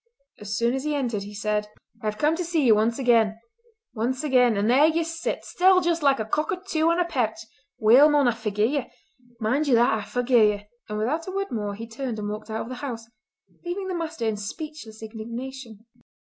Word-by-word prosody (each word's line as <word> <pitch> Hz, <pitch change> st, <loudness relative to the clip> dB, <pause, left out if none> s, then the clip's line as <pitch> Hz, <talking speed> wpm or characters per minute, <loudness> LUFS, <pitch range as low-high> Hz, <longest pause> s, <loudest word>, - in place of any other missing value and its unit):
As 210 Hz, +1 st, -4 dB
soon 235 Hz, +1 st, +1 dB
as 265 Hz, 0 st, -2 dB
he 300 Hz, 0 st, -1 dB
entered 240 Hz, -7 st, -1 dB
he 205 Hz, +1 st, -9 dB
said: 210 Hz, 0 st, -1 dB, 0.3 s
"I 215 Hz, -, -3 dB
have 210 Hz, 0 st, -2 dB
come 300 Hz, +7 st, +2 dB
to 355 Hz, -, -2 dB
see 330 Hz, -3 st, 0 dB
ye 235 Hz, -, +6 dB
once 220 Hz, +2 st, +3 dB
again—once 245 Hz, -, -1 dB
again; 250 Hz, -6 st, +3 dB
and 200 Hz, +1 st, +1 dB
there 270 Hz, +6 st, +5 dB
ye 325 Hz, +1 st, +1 dB
sit, 330 Hz, 0 st, -4 dB
still 370 Hz, +1 st, +4 dB
just 340 Hz, -2 st, 0 dB
like 275 Hz, -2 st, +3 dB
a 220 Hz, -, -2 dB
cockatoo 315 Hz, -, -1 dB
on 335 Hz, +1 st, +2 dB
a 355 Hz, -, +2 dB
pairch. 240 Hz, -9 st, -1 dB, 0.4 s
Weel, 250 Hz, +8 st, +7 dB
mon, 290 Hz, -3 st, +3 dB
I -, -, +4 dB
forgie 215 Hz, -2 st, -1 dB
ye! 275 Hz, +2 st, -1 dB, 0.5 s
Mind 265 Hz, +8 st, 0 dB
ye 260 Hz, -, +4 dB
that, 235 Hz, -1 st, +4 dB
I 220 Hz, -, -1 dB
forgie 245 Hz, +4 st, -3 dB, 0.2 s
ye!" 205 Hz, 0 st, -9 dB, 0.2 s
And 210 Hz, -, -3 dB
without 285 Hz, -, -1 dB
a -, -, -4 dB
word 395 Hz, -4 st, -3 dB
more 210 Hz, -3 st, -3 dB
he 230 Hz, +2 st, -8 dB
turned 235 Hz, 0 st, -5 dB
and 205 Hz, -1 st, -4 dB
walked 215 Hz, +1 st, -6 dB
out 220 Hz, 0 st, -3 dB
of 230 Hz, -, -7 dB
the 255 Hz, -, -5 dB
house, 235 Hz, -5 st, -5 dB, 0.6 s
leaving 370 Hz, +2 st, -4 dB
the -, -, -2 dB
master 325 Hz, -7 st, -3 dB
in 220 Hz, -1 st, 0 dB
speechless 225 Hz, 0 st, -7 dB
indignation. 230 Hz, +1 st, -8 dB
245 Hz, 210 wpm, -25 LUFS, 220-310 Hz, 0.6 s, Weel